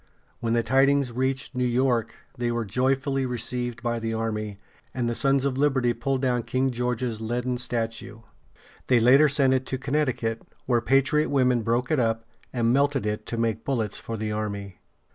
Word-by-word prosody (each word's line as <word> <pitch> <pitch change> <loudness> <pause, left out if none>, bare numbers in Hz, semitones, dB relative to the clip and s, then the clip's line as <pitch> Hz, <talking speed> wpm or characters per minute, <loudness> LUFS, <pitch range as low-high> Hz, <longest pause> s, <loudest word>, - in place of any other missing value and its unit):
When 115 -1 -1
the 115 0 +2
tidings 135 0 +3
reached 130 +2 -1
New 125 -1 -1
York, 125 -1 +1 0.2
they 120 -2 -1
were 120 -1 -1
joyfully 135 +5 0
received 120 -1 -3
by 120 -1 -1
the 115 0 -2
army, 110 -2 -3 0.4
and 125 -2 0
the 120 - 0
Sons 135 +2 +2
of 135 -1 -1
Liberty 135 -4 +2
pulled 135 +3 -2
down 125 -2 +1
King 130 +3 0
George's 125 -2 -2
leaden 120 +2 -2
statue. 115 -2 -3 0.7
They 125 -2 +5
later 135 +6 +6
sent 135 -2 +3
it 130 0 0
to 130 - -2
Connecticut, 130 -5 -1 0.2
where 120 -2 +2
patriot 135 +5 +2
women 125 -4 +2
broke 120 +4 0
it 155 - +3
up 115 -1 0 0.3
and 120 -1 +1
melted 140 -2 +2
it 105 0 -3
to 115 - -3
make 115 -2 -1
bullets 115 -6 -1
for 115 - -5
the 110 0 -3
army. 100 -3 -4
125 Hz, 180 wpm, -25 LUFS, 115-135 Hz, 0.7 s, later